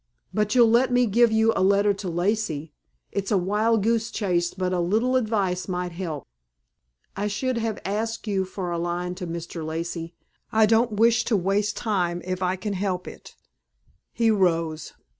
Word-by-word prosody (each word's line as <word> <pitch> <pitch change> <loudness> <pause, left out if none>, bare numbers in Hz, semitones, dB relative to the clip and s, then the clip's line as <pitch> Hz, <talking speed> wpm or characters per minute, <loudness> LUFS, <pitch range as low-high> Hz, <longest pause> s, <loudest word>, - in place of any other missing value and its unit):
"But 210 +1 0
you'll 240 -2 +7
let 250 +2 +4
me 245 0 +4
give 235 +2 +4
you 220 +1 +3
a - - +1
letter 200 +2 +4
to 195 -2 -5
Lacey? 175 -4 -1 0.4
It's 200 -1 -2
a 205 - +3
wild 210 +4 +1
goose 225 0 +1
chase 175 -6 0
but 185 -1 -2
a 180 - 0
little 220 +9 +1
advice 205 -7 0
might 180 -1 -3
help." 165 -5 -5 0.9
"I 205 +2 -1
should 240 +4 -1
have 225 -2 -2
asked 225 +4 -2
you 195 -3 0
for 185 -1 -5
a 170 - -2
line 175 +1 -2
to 180 -1 -6
Mr. 170 0 -5
Lacey. 165 +1 -4 0.4
I 220 -1 +5
don't 225 +1 +3
wish 230 +3 +4
to 220 - +2
waste 200 +3 0
time 175 -5 -1
if 185 0 -3
I 180 0 +1
can 200 +2 -4
help 185 -2 -2
it." - - -11 0.8
He 230 -1 +2
rose. 165 -6 0
195 Hz, 180 wpm, -25 LUFS, 180-220 Hz, 0.9 s, you'll